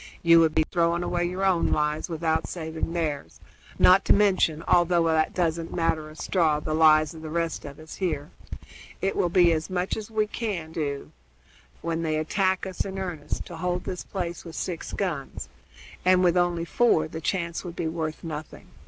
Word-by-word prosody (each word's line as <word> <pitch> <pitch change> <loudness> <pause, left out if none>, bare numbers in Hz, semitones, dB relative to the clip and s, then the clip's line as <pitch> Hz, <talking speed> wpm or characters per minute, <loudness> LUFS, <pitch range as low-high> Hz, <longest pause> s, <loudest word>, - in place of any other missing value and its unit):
"You 165 0 +7
would 160 -1 +3
be 160 -1 +3
throwing 170 0 +1
away 175 0 0
your 185 +2 -2
own 185 -3 +2
lives 150 +2 0
without 160 -1 -1
saving 160 -1 -4
theirs, 155 -5 -3 0.4
not 185 +2 +6
to - - +6
mention, 185 -6 +2
although 175 -1 +4
that 160 -1 +1
doesn't 165 -2 -1
matter 160 -2 0
a 155 - -13
straw, 160 -2 +1
the 155 +1 -3
lives 155 0 +5
of 160 - -10
the 160 - -6
rest 165 0 -2
of 140 -1 -9
us 155 0 -11
here. 155 -5 -2 0.7
It 195 - -1
will 175 - +1
be 175 -1 +5
as 160 -1 -1
much 185 0 -1
as 215 -1 -6
we 215 -1 +1
can 205 -7 -4
do, 145 -4 -4 0.7
when 165 0 -1
they 155 -2 0
attack 190 +5 0
us 190 -1 -3
in 195 -1 -6
earnest, 175 -6 -4
to 170 - -9
hold 180 +1 -2
this 180 -2 -5
place 175 -3 -5
with 165 -2 -9
six 175 -3 -4
guns, 150 - -4 0.5
and 185 0 +4
with 175 -1 +4
only 175 -1 +1
four 170 -8 +2
the 160 +1 -7
chance 170 -1 -2
would 175 -2 -7
be 170 - -2
worth 160 -1 -4
nothing. 155 -2 -7
170 Hz, 190 wpm, -26 LUFS, 160-180 Hz, 0.7 s, You